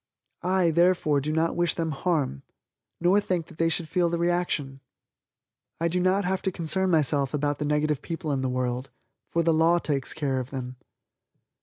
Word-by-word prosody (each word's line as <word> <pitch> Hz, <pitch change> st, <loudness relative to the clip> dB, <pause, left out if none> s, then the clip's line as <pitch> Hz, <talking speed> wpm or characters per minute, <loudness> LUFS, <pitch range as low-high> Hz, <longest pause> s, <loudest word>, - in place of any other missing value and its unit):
I, 180 Hz, -1 st, +2 dB
therefore, 170 Hz, -4 st, +3 dB
do 150 Hz, +3 st, -2 dB
not 160 Hz, +1 st, +1 dB
wish 175 Hz, 0 st, +1 dB
them 165 Hz, -2 st, -1 dB
harm, 145 Hz, -, -1 dB, 0.6 s
nor 185 Hz, +4 st, +4 dB
think 180 Hz, -4 st, -1 dB
that 160 Hz, -, -16 dB
they 165 Hz, 0 st, +3 dB
should 165 Hz, 0 st, -2 dB
feel 170 Hz, +2 st, +1 dB
the 170 Hz, -, -1 dB
reaction. 170 Hz, -6 st, -1 dB, 1.0 s
I 170 Hz, +1 st, +1 dB
do 180 Hz, +2 st, 0 dB
not 185 Hz, +2 st, +2 dB
have 190 Hz, 0 st, 0 dB
to 190 Hz, -, -1 dB
concern 185 Hz, +2 st, -1 dB
myself 145 Hz, -4 st, +2 dB
about 145 Hz, 0 st, -1 dB
the 150 Hz, -, -1 dB
negative 150 Hz, -1 st, 0 dB
people 165 Hz, -2 st, -4 dB
in 135 Hz, -2 st, 0 dB
the 130 Hz, -, -1 dB
world 125 Hz, +1 st, -2 dB, 0.4 s
for 170 Hz, -, +1 dB
the 165 Hz, 0 st, +3 dB
law 165 Hz, +2 st, +4 dB
takes 140 Hz, -6 st, -1 dB
care 140 Hz, -4 st, -1 dB
of 130 Hz, 0 st, -5 dB
them. 130 Hz, -2 st, -6 dB
160 Hz, 185 wpm, -26 LUFS, 140-175 Hz, 1.0 s, nor